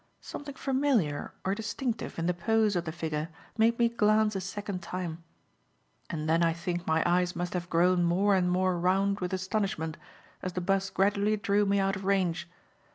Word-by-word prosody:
Something 285 -1 -8
familiar 260 - 0
or 190 - +1
distinctive 225 +3 -3
in 165 - -1
the 180 - +2
pose 215 +4 +2
of 175 -1 -1
the 160 - -3
figure 155 -1 -3 0.3
made 230 +1 +3
me 235 - +4
glance 215 -2 +2
a 190 - -1
second 195 0 -5
time; 170 -1 -5 0.9
and 155 -2 -3
then 165 +2 +3
I 165 -1 +3
think 175 +1 -4
my 160 0 +3
eyes 180 +1 +2
must 175 0 -3
have 175 -1 -3
grown 175 +1 +3
more 190 +4 +3
and 180 -2 +2
more 185 0 +1
round 195 +3 +2
with 180 -1 -3
astonishment 185 -4 -2 0.4
as 185 - -4
the 180 - -2
'bus 195 +2 +1
gradually 205 +2 +2
drew 205 0 +2
me 200 0 +2
out 195 0 +1
of 190 - -6
range. 185 -3 0
185 Hz, 185 wpm, -29 LUFS, 175-205 Hz, 0.9 s, me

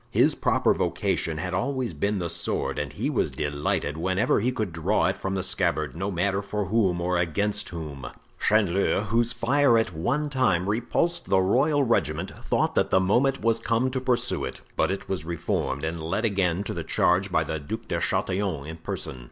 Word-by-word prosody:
His - - +4
proper - - +2
vocation 80 -2 -1
had 90 +3 -3
always 125 +2 -1
been 100 +7 -1
the 90 -2 -2
sword 85 - -1
and - - -3
he - - -3
was - - 0
delighted 75 +1 -2
whenever 95 +7 +1
he 120 +5 +1
could 110 -8 -3
draw 85 +6 +1
it - - +1
from 95 0 -3
the 95 - -1
scabbard, 75 -7 0
no 95 +4 -2
matter 95 +2 0
for 105 0 -3
whom 95 -3 +1
or 90 0 0
against 100 +5 -1
whom. 75 -7 -6 0.3
Chanleu, 100 -2 +2
whose 115 +2 +2
fire 130 0 +3
at 110 -5 0
one 125 - 0
time 100 -11 +1
repulsed 120 +11 0
the 95 - +4
royal 140 +10 +3
regiment, 90 - 0
thought - - +1
that - - +2
the 95 - +4
moment 125 +9 +2
was 115 0 +3
come 120 +3 +1
to 130 0 -2
pursue 125 -2 0
it; - - -5
but - - +2
it 95 +1 -3
was 95 -5 -3
reformed 80 -4 -2
and 80 +1 -3
led 95 +8 -1
again 95 -3 +1
to - - -4
the - - -4
charge 95 +2 +2
by 80 - +2
the 80 0 -3
Duc 110 +11 -6
de 85 - -1
Chatillon 95 -6 0
in 80 +2 -7
person. 75 -5 -5
95 Hz, 195 wpm, -26 LUFS, 85-115 Hz, 0.3 s, His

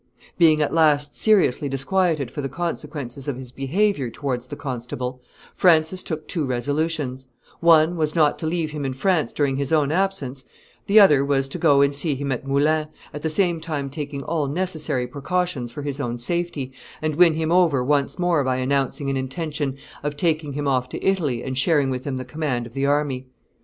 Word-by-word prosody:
Being 155 -3 +5
at - - -2
last 150 -3 +3
seriously 185 - +3
disquieted 150 0 0
for 145 - -4
the 135 - -3
consequences 145 -4 -5
of 140 -4 -2
his 130 -2 -9
behavior 140 - 0
towards 125 -1 -4
the - - -6
constable, 125 -2 -5 0.3
Francis 170 +1 +3
took 155 -2 -5
two 165 - -2
resolutions: 135 0 -2 0.3
one 165 0 +5
was, 155 -1 -1
not 155 -3 +3
to 160 - -2
leave 160 -2 -1
him 150 -1 -4
in 135 -1 -2
France 160 -1 +1
during 140 -2 0
his 140 +1 -2
own 150 -3 +3
absence; 155 -8 -1 0.4
the 210 +2 +7
other 150 -9 +6
was, 140 -1 +1
to - - -5
go 140 -1 +5
and 140 0 +3
see 140 +1 0
him 140 +1 -3
at 130 +2 -3
Moulins, 150 +3 +2 0.3
at 150 - -6
the 160 - -1
same 170 0 +1
time 145 -4 -4
taking 145 -1 -5
all 155 -3 -1
necessary 155 -5 -1
precautions 140 -1 -2
for 145 +4 -7
his 140 -1 -4
own 120 -3 -2
safety, 150 0 -2 0.3
and 155 -1 -2
win 170 -1 +5
him 160 0 -1
over 170 -8 +3
once 140 +1 +1
more 175 -5 +2
by 130 -1 0
announcing 135 +2 -1
an 135 - -1
intention 145 +1 -3 0.2
of 145 0 -3
taking 155 -2 0
him 145 +1 -2
off 130 -2 +1
to - - -6
Italy 150 -11 +1
and 130 0 -2
sharing 145 -3 +2
with 130 0 -4
him 135 -3 -2
the 130 - -5
command 130 -3 -2
of 115 - -12
the 135 +1 0
army. 140 -3 0
145 Hz, 195 wpm, -23 LUFS, 135-160 Hz, 0.4 s, the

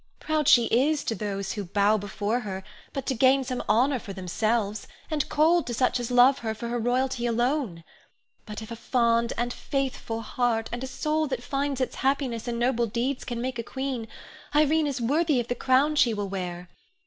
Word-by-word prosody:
Proud 310 -2 0
she 240 -2 +7
is 285 +7 +2
to - - -1
those 200 -1 -3
who 205 - -3
bow 200 +3 +2
before 205 +3 -2
her 190 -5 -5 0.3
but 275 - -4
to - - 0
gain 265 +2 +4
some 255 -1 -3
honor 250 +5 +3
for 200 -3 -8
themselves, 210 +3 -1 0.2
and 300 -2 -1
cold 325 +3 +3
to 240 - -2
such 250 +1 +1
as 240 0 -3
love 250 +2 +5
her 220 -1 -3
for 235 +2 -5
her 240 0 -1
royalty 245 +1 0
alone. 240 - 0 0.6
But 210 +1 -6
if 220 - -10
a - - -4
fond 235 -1 +1
and 240 +1 -1
faithful 260 -4 -3
heart, 225 0 -1
and 240 +2 -4
a - - -3
soul 310 +3 -1
that 260 -3 -3
finds 275 0 -2
its 255 - -2
happiness 260 -4 -1
in 235 -1 -2
noble 240 -1 +1
deeds 245 +5 -2
can 240 -1 -4
make 250 -1 -3
a - - -2
queen, 260 -2 -4 0.5
Irene 305 +1 +4
is 280 -3 -2
worthy 290 +4 +2
of 240 - -3
the - - +2
crown 265 +5 +2
she 235 -6 +3
will 205 -1 -3
wear. 180 -2 -5
240 Hz, 200 wpm, -26 LUFS, 225-270 Hz, 0.6 s, she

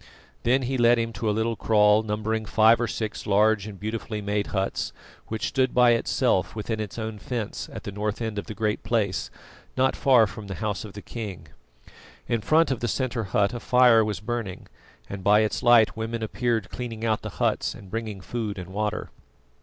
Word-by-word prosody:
Then 130 +3 +2
he 130 +1 -1
led 120 0 +5
him 115 0 -2
to 110 -2 -2
a 105 - 0
little 115 +1 0
kraal 105 -1 +4
numbering 110 +1 -2
five 110 +1 +5
or 120 - +1
six 110 -2 -4
large 105 0 +3
and 100 -3 -9
beautifully 110 0 -4
made 105 0 -1
huts, 95 -1 -2 0.3
which 110 0 -3
stood 130 -2 0
by 125 -1 +6
itself, 115 -4 +1
within 110 +1 -3
its 105 -1 -5
own 110 -2 -4
fence, 115 0 -4
at - - -8
the - - -5
north 105 +1 -3
end 110 -3 -3
of - - -8
the 110 - -6
Great 110 -1 -1
Place, 105 -5 -1 0.5
not 130 +1 +3
far 125 -5 +5
from 105 0 -8
the 95 - -5
house 105 0 -3
of 105 -3 -9
the 105 - -9
king. 105 -6 -7 0.8
In 115 - 0
front 155 +7 +3
of 130 - -1
the 120 - -1
centre 120 -2 -1
hut 100 +3 +1
a 120 - -4
fire 125 -2 +5
was 105 -4 -3
burning, 110 -4 -4 0.4
and 100 -1 -7
by 105 +2 +5
its 110 - -1
light 120 -2 +5
women 115 0 -3
appeared 115 -2 -1
cleaning 115 -2 -5
out 110 -2 +1
the - - -5
huts - - 0
and 95 -2 -13
bringing 110 -3 -4
food 110 0 -4
and 90 -1 -7
water. 105 +1 -3
110 Hz, 200 wpm, -25 LUFS, 105-115 Hz, 0.8 s, by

